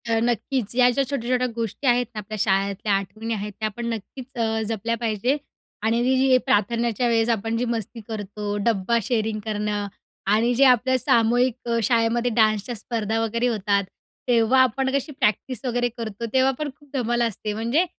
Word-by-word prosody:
अ, 225 0 +2
नक्कीच 240 0 -1
या 250 0 +6
ज्या 275 +3 +1
छोट्या-छोट्या 255 -2 0
गोष्टी 230 +4 -3
आहेत 245 0 +4
ना, 215 - -4
आपल्या 215 +1 -6
शाळेतल्या 200 +1 +1
आठवणी 215 +4 -2
आहेत 210 -1 -4
त्या 215 0 0
पण 240 - -4
नक्कीच 230 +4 -8
अ, 225 -1 0
जपल्या 230 +1 -1
पाहिजेत. 230 +4 0 0.5
आणि 225 +2 +2
ही 260 +1 +4
प्रार्थनेच्या 235 +1 +1
वेळेस 230 0 +2
आपण 225 0 0
जी 245 - 0
मस्ती 230 -1 -4
करतो, 205 -1 -4
डब्बा 230 0 +2
शेअरिंग 220 -2 -1
करणं 210 -1 -2 0.4
आणि 230 +3 +3
जे 270 - +4
आपल्या 255 0 +4
सामूहिक 240 +1 +3
अ, 235 - +2
शाळेमध्ये 235 +2 +2
डान्सच्या 215 +1 +2
स्पर्धा-वगैरे 225 +1 -1
होतात, 205 -3 +1 0.4
तेव्हा 240 +1 +4
आपण 265 +2 0
कशी 280 +2 -1
प्रॅक्टिस 255 -1 -1
वगैरे 245 0 0
करतो, 225 -1 -5
तेव्हा 260 0 +4
पण 300 -1 -2
खूप 290 -1 -23
धमाल 240 -2 0
असते. 210 -1 -4
म्हणजे 235 - +1
230 Hz, 165 wpm, -23 LUFS, 215-245 Hz, 0.5 s, या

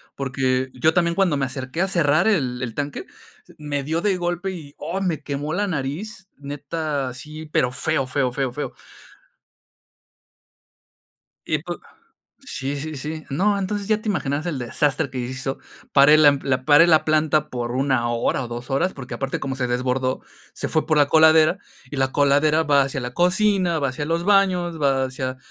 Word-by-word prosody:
Porque 130 -1 -1
yo 155 +6 +2
también 170 -1 +1
cuando 175 -6 +2
me 135 - 0
acerqué 130 +4 -4
a 190 - +2
cerrar 165 -1 +2
el 130 - +1
el 115 -3 -4
tanque, 145 0 -4 0.5
me 145 -2 -3
dio 160 +4 -1
de 200 -2 +1
golpe 175 +2 -2
y, 155 -6 -9
oh, 170 +6 -4
me 170 -6 -1
quemó 145 +2 -4
la 205 +4 0
nariz. 180 +6 -4
Neta, 145 -1 -4
sí. 155 +5 -9
Pero 125 -4 +1
feo, 145 -1 -1
feo, 130 -1 0
feo, 135 0 -2
feo. 145 +4 -5 2.7
Y - - +1
pu - - -5 0.6
Sí, 135 +2 -4
sí, 155 +2 -5
sí. 155 +3 -5
No, 200 +8 +1
entonces, 200 +1 -3
ya 215 -1 +2
te 215 - -6
imaginaras 150 -4 -1
el 150 -6 -2
desastre 140 +4 0
que 130 - -6
hizo. 130 +2 -4 0.3
Paré 140 +2 +7
la 155 -1 +7
m 140 -1 +3
la 130 -1 0
paré 150 +4 +7
la 160 -2 +4
planta 155 -1 +2
por 120 -1 -3
1 130 -2 +1
hora 120 +2 0
o 120 - -7
2 120 +2 -7
horas. 175 +8 +1
Porque 135 -1 -7
aparte 135 0 -3
como 135 -1 -3
se 130 -2 -1
desbordó, 130 +1 -1 0.3
se - - -4
fue 155 - 0
por 155 - +2
la 145 -1 +4
coladera, 160 +3 +5 0.3
y 145 - -6
la 135 0 0
coladera 145 +3 +3
va 145 -2 +4
hacia 135 0 -3
la 125 0 -5
cocina, 180 -1 +2
va 140 - +1
hacia 130 +3 -4
los 165 +2 0
baños, 185 -5 +2
va 135 -2 +2
hacia 130 0 -4
145 Hz, 185 wpm, -22 LUFS, 135-165 Hz, 2.7 s, Paré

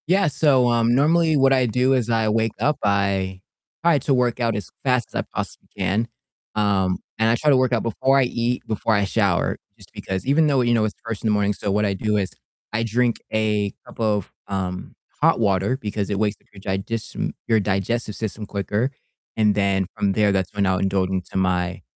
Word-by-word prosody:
Yeah, 195 +4 +3
so, 140 -4 +3
um, 120 0 +3
normally 160 +3 +3
what 135 0 +4
I 130 -1 +3
do 125 +3 +2
is 125 -3 0
I 115 -1 +2
wake 110 0 +1
up, 150 0 +1
I 100 -2 0 0.4
try 170 -4 +4
to 140 - 0
work 125 -1 +1
out 115 -2 +1
as 105 -4 -5
fast 125 -3 +1
as - - -1
I - - -1
possibly - - -5
can, 110 +5 0 0.5
um, 100 -3 +1 0.2
and 110 0 +3
I 115 - +4
try 150 +5 +1
to 135 - +5
work 130 -1 +2
out 120 -3 +1
before 130 +4 +2
I - - +4
eat, 120 0 -1
before 110 0 0
I 100 - +2
shower, 100 -6 +1 0.2
just - - -16
because 95 0 -4
even 150 +4 +3
though, 140 -3 +3
you 120 -1 +2
know, 110 -2 +3
it's 105 - -3
first 115 -2 -4
in - - 0
the - - +3
morning 105 0 +2
so 100 0 -3
what 105 +2 +2
I 100 - +1
do 105 +2 0
is 95 -2 -1 0.4
I 110 +1 0
drink 120 +1 +1 0.2
a 105 -2 +1
cup - - -15
of, 105 -4 0 0.2
um, 95 -2 -4 0.3
hot - - +4
water 100 +3 +1
because 105 -5 -3
it 100 - -1
wakes 105 0 0
up - - -33
your 100 - -13 0.2
diges 115 +3 -4 0.2
your 110 -1 +4
digestive 105 +2 -1
system 110 -1 -4
quicker 105 +5 -1 0.5
and 105 -1 +4
then 100 -1 +1
from 100 -1 0
there, 105 -1 +3
that's 95 -1 -1
when 100 -1 +1
I'll 95 -1 +1
indulge 95 -1 0
into 95 0 -3
my 90 -1 0
110 Hz, 215 wpm, -22 LUFS, 100-120 Hz, 0.5 s, to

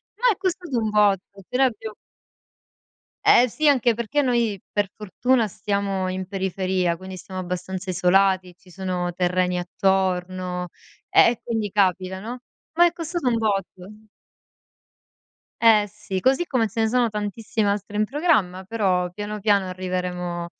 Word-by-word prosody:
ma - - +3
è - - -16
costato 355 -7 -3
un 220 -1 -1
botto. 200 -2 +1
Appena 250 +8 +1
abbiam 220 -3 -3 1.3
Ehm, 245 - +7
sì, 305 +5 +2
anche 245 -4 +3
perché 235 +6 -1
noi 235 -7 0
per 205 -2 0
fortuna 225 +3 0
stiamo 195 -1 -2
in 185 0 -4
periferia, 185 -2 -1
quindi 190 0 -9
siamo 185 +1 -8
abbastanza 185 +1 -5
isolati, 185 0 +2
ci 180 - -21
sono 180 -1 -3
terreni 180 0 0
attorno, 180 -1 -1 0.4
ehm, - - +6
e 240 - -6
quindi 225 -3 -2
capita, 190 -2 +1
no. 240 +4 -7 0.3
Ma 345 +1 +6
è 345 - +3
costato 335 -5 -2
un 230 - +1
botto. 210 0 -3 1.5
Ehm, 220 -3 +6
sì, 195 -2 -5
così 270 - +2
come 245 -7 +1
ce 225 +2 -3
ne 220 - +3
sono 240 -1 +2
tantissime 210 0 -2
altre 205 +1 -3
in 215 - +2
programma, 215 - +1
però 185 -4 0
piano 205 +3 -5
piano 200 -2 +2
arriveremo 180 -1 -3
200 Hz, 145 wpm, -23 LUFS, 185-225 Hz, 1.5 s, Ehm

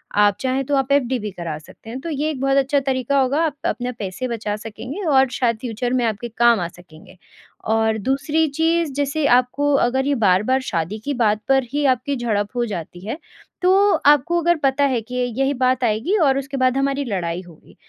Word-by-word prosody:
आप 205 -1 +4
चाहें 265 +1 -1
तो 285 - 0
आप 270 0 0
एफडी 260 -3 +2
भी 210 -1 -5
करा 170 -4 -5
सकते 190 +7 -15
हैं 250 +3 -5
तो 335 - -5
ये 300 0 -1
एक 295 -4 -4
बहुत 275 0 +2
अच्छा 275 +1 +2
तरीका 270 0 0
होगा 270 +4 +1
आप 300 -3 -2
अपने 245 0 -1
पैसे 210 +1 -5
बचा 220 -3 -3
सकेंगे 225 - -7
और 270 -4 +4
शायद 235 -3 0
फ्यूचर 245 +1 -3
में 250 -2 +1
आपके 225 +1 -2
काम 235 -2 +5
आ 175 - -2
सकेंगे। 175 +1 -16 0.6
और 220 0 +1
दूसरी 280 +8 0
चीज़ 325 +2 0
जैसे 285 +2 -1
आपको 255 +4 +2
अगर 265 +2 0
ये 285 - +2
बार-बार 215 +4 +2
शादी 195 -2 -3
की 285 - -1
बात 215 -4 +1
पर 270 0 +3
ही 290 0 0
आपकी 260 +1 +1
झड़प 215 -5 -1
हो 240 -1 0
जाती 175 -4 -6
है, 225 +7 -4 0.4
तो 390 +3 +4
आपको 295 +4 +4
अगर 345 +1 +3
पता 275 +1 +2
है 255 -4 0
कि 250 +3 -9
य 250 0 +1
यही 270 +1 +1
बात 255 -1 +1
आएगी 235 - +1
और 270 -1 +3
उसके 275 0 -4
बाद 255 0 +2
हमारी 275 +1 0
लड़ाई 180 -6 -3
होगी। 175 -4 -17
255 Hz, 210 wpm, -21 LUFS, 220-280 Hz, 0.6 s, काम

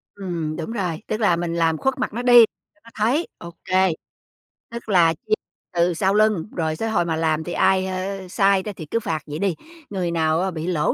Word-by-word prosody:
Ừm, 170 -6 -4
đúng 165 +6 -5
rồi. 180 -8 -3
Tức 215 - -2
là 205 -6 +3
mình 170 0 -3
làm 165 -1 +2
khuất 265 - -1
mặt 255 - -2
nó 235 - -3
đi, 245 -2 +8 0.3
cho - - -32
nó - - -15
thấy, 245 +10 +1
OK. 185 +2 0 0.8
Tức 235 -1 -8
là 170 -5 +5
chia 165 - -5 0.4
từ 175 0 +2
sau 190 +4 +1
lưng, 215 -3 +2
rồi 160 -2 -1
tới 225 - -2
hồi 175 -6 +1
mà 165 -1 -1
làm 160 -1 0
thì 175 - -5
ai, 190 0 +3
ơ, 190 +1 -4
sai 195 0 +2
đó 210 - -4
thì 160 - -8
cứ 230 - -1
phạt 160 -7 -2
vậy 150 +1 -6
đi. 195 -3 0 0.3
Người 185 -4 -2
nào, 160 -1 +1
ơ, 190 0 -1
bị 165 0 -5
lỗ 165 -5 +1
185 Hz, 225 wpm, -22 LUFS, 165-210 Hz, 0.8 s, đi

